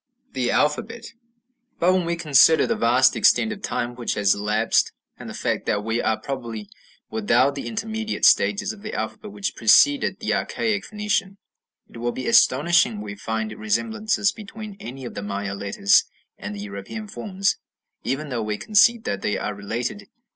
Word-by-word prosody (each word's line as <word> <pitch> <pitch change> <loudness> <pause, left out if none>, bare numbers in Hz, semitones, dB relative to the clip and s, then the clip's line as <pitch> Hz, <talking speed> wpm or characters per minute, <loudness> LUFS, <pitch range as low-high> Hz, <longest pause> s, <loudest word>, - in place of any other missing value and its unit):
### - - -37
The 125 -2 -1
Alphabet 185 - -1 0.6
But 180 +2 +3
when 185 -2 +1
we 170 - 0
consider 160 -1 +5
the 235 - 0
vast 130 - +3
extent 225 - +3
of 205 - -11
time 120 -8 -3
which 120 -1 -3
has 100 -1 +3
elapsed, 105 +2 +1 0.3
and - - -8
the - - -7
fact - - -2
that 105 0 0
we 115 +2 -1
are 110 - 0
probably 115 -6 -6 0.4
without 120 +5 +2
the 140 - -6
intermediate 220 0 -2
stages 210 +1 +3
of 210 - -14
the 215 - -6
alphabet 210 - -5
which 205 -1 -4
preceded 280 - +4
the - - -1
archaic 210 -3 -1
Phoenician, 210 -2 -2 0.5
it - - -14
will 120 +1 -2
be 130 +1 -6
astonishing 150 0 +4
if 105 - -6
we 100 -1 -6
find 110 +1 -4
resemblances 210 - 0
between 215 -1 -9
any 130 -6 -8
of - - -7
the - - -5
Maya 100 -1 -4
letters 100 0 +2 0.3
and 105 - -7
the 100 - -7
European 100 - -7
forms, 195 -1 -2 0.5
even 145 +3 -3
though 120 -3 -2
we 105 -1 -2
concede 220 - +4
that 100 - -3
they 105 - -1
are 105 - -3
related. 115 - -5
135 Hz, 175 wpm, -23 LUFS, -, 0.6 s, consider